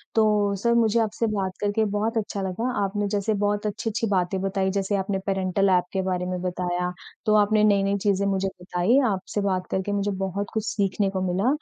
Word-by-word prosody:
तो 210 Hz, -2 st, +3 dB
सर, 235 Hz, 0 st, +3 dB
मुझे 230 Hz, -1 st, +3 dB
आपसे 225 Hz, +1 st, 0 dB
बात 190 Hz, -2 st, -2 dB
करके 205 Hz, +2 st, +1 dB
बहुत 225 Hz, +2 st, -1 dB
अच्छा 205 Hz, -2 st, -2 dB
लगा। 195 Hz, +7 st, -2 dB
आपने 205 Hz, +1 st, -1 dB
जैसे 205 Hz, +1 st, 0 dB
बहुत 205 Hz, +1 st, 0 dB
अच्छी-अच्छी 225 Hz, +1 st, -2 dB
बातें 185 Hz, 0 st, +1 dB
बताई, 195 Hz, 0 st, 0 dB
जैसे 200 Hz, +1 st, -1 dB
आपने 195 Hz, 0 st, -1 dB
पेरेंटल 195 Hz, 0 st, +1 dB
एप 180 Hz, -1 st, +4 dB
के 190 Hz, -, +1 dB
बारे 185 Hz, -1 st, -1 dB
में 180 Hz, 0 st, -3 dB
बताया, 180 Hz, 0 st, -2 dB, 0.3 s
तो 215 Hz, 0 st, +4 dB
आपने 210 Hz, +1 st, +4 dB
नई-नई 200 Hz, -1 st, +3 dB
चीज़ें 200 Hz, 0 st, +2 dB
मुझे 195 Hz, 0 st, 0 dB
बताई। 180 Hz, +8 st, +2 dB
आपसे 190 Hz, +2 st, -3 dB
बात 185 Hz, -2 st, -1 dB
करके 190 Hz, +2 st, -1 dB
मुझे 205 Hz, 0 st, 0 dB
बहुत 195 Hz, +2 st, -3 dB
कुछ 220 Hz, -1 st, -1 dB
सीखने 200 Hz, -1 st, 0 dB
को 190 Hz, -1 st, -3 dB
मिला 195 Hz, +6 st, +1 dB
200 Hz, 195 wpm, -25 LUFS, 190-210 Hz, 0.3 s, एप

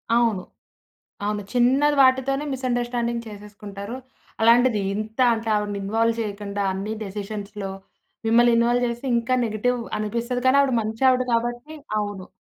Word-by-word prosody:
అవును. 230 Hz, -6 st, +2 dB, 0.8 s
ఆమె 210 Hz, 0 st, -1 dB
చిన్నది 265 Hz, +4 st, +3 dB
వాటితోనే 265 Hz, +2 st, +3 dB
మిస్‌అండర్‌స్టాండింగ్ 240 Hz, -2 st, -2 dB
చేసేసుకుంటారు. 205 Hz, +1 st, -8 dB, 0.5 s
అలాంటిది 235 Hz, -1 st, +5 dB
ఇంతా 220 Hz, +4 st, 0 dB
అంటా 225 Hz, 0 st, -3 dB
ఆవిడని 205 Hz, -1 st, -3 dB
ఇన్వాల్వ్ 225 Hz, +3 st, +1 dB
చెయ్యకండా 205 Hz, -1 st, -4 dB
అన్నీ 195 Hz, +3 st, -4 dB
డెసిషన్స్‌లో 200 Hz, 0 st, -6 dB, 0.6 s
మిమ్మల్నిన్‌వాల్వ్ 240 Hz, +1 st, +4 dB
చేస్తే 235 Hz, +3 st, -4 dB
ఇంకా 240 Hz, +2 st, 0 dB
నెగెటివ్ 235 Hz, +3 st, -1 dB, 0.2 s
అనిపిస్తది, 235 Hz, +4 st, -2 dB
కానీ 260 Hz, +2 st, +5 dB
ఆవిడ 275 Hz, -2 st, +1 dB
మంచావిడ 255 Hz, +4 st, +2 dB
కాబట్టీ 240 Hz, +6 st, -2 dB, 0.2 s
అవును. 205 Hz, -3 st, -5 dB
230 Hz, 115 wpm, -23 LUFS, 210-245 Hz, 0.8 s, అలాంటిది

